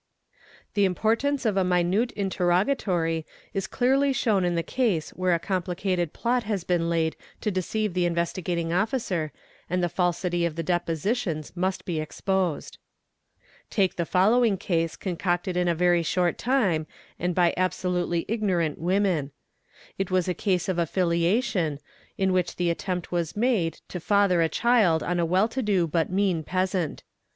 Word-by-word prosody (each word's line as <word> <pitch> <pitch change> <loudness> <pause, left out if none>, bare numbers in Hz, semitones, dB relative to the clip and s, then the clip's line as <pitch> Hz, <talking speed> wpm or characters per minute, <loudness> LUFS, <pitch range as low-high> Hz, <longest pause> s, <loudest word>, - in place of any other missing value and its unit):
| - - -27
The 205 - +2
importance 230 +9 0
of 210 -3 +1
a 190 - +3
minute 180 +6 +1
interrogatory 180 - 0 0.3
is 195 -1 -2
clearly 270 +5 +2
shown 210 -7 +1
in 175 -1 +1
the— 170 - 0
case 210 -11 0
where 185 -1 +1
a - - +2
complicated 180 -1 -1
plot 245 +1 0
has 205 -4 -2
been 175 -2 0
laid 165 -1 0 0.3
to 210 - 0
deceive 200 +2 -1
the 180 -1 +1
Investigating 170 0 -1
Officer 185 - -1 0.4
and 180 +1 0
the 175 - +1
falsity 175 0 0
of 170 -2 -1
the 165 - -3
depositions 170 - -1
must 185 +1 -2
be 170 -5 -2
exposed. 185 +1 -2 0.9
Take 190 -4 +1
the 170 -2 -2
following 210 +3 +3
case 165 -4 -1
concocted 175 0 -2
in 180 0 +1
a 170 - +2
very 175 0 +3
short 175 +1 0
time 200 - +1 0.3
and 175 0 -1
by 175 -2 +3
abso 185 0 -1
lutely 175 -1 -1
ignorant 185 -9 0
women. 180 -4 +1 0.7
It 195 - -1
was 185 -1 +1
a 180 - +1
case 180 -2 0
of 185 -2 -1
affiliation, 170 - +1 0.4
in 190 -2 +1
which 180 -1 0
the 175 -1 +1
attempt 180 +1 -4
was 170 0 -2
made 215 -8 +1
to 180 - -5
father 200 -1 +3
a 165 - +2
child 210 -6 +3
on 175 0 -1
a 170 - +1
well 185 +5 +3
to 260 +3 -2
do 200 -6 +2
but 165 0 0
mean 185 -3 +1
peasant. 185 -1 -1
180 Hz, 160 wpm, -26 LUFS, 170-200 Hz, 0.9 s, a